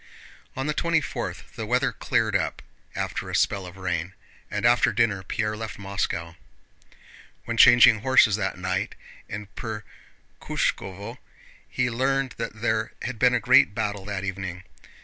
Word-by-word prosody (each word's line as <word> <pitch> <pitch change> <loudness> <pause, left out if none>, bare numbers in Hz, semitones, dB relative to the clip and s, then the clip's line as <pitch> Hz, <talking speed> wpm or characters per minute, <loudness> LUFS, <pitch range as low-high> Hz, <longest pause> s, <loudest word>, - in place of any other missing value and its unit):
On 130 - -3
the 150 - 0
twenty 170 +1 +2
fourth 150 - -6
the - - -5
weather - - +2
cleared - - 0
up - - -1 0.3
after - - -3
a - - -3
spell 95 -2 +1
of 90 +2 -11
rain, 90 0 -3 0.3
and 105 +2 -2
after 120 -1 +5
dinner 105 -3 +1
Pierre 105 +2 -2
left 110 -1 -6
Moscow. 95 -4 -3 1.1
When 115 - -3
changing 115 -1 +8
horses 125 -4 +5
that 95 -3 -2
night 95 +2 -2 0.3
in 105 0 -6
Perkhúshkovo, 105 -3 -5 0.5
he 125 -1 0
learned 135 +2 0
that 110 -2 -5
there 110 -1 0
had 125 -4 -4
been 125 +1 +4
a - - +2
great 100 -1 +5
battle 105 -3 -2
that 100 -2 -4
evening. 95 -2 -5
105 Hz, 150 wpm, -25 LUFS, 95-120 Hz, 1.1 s, changing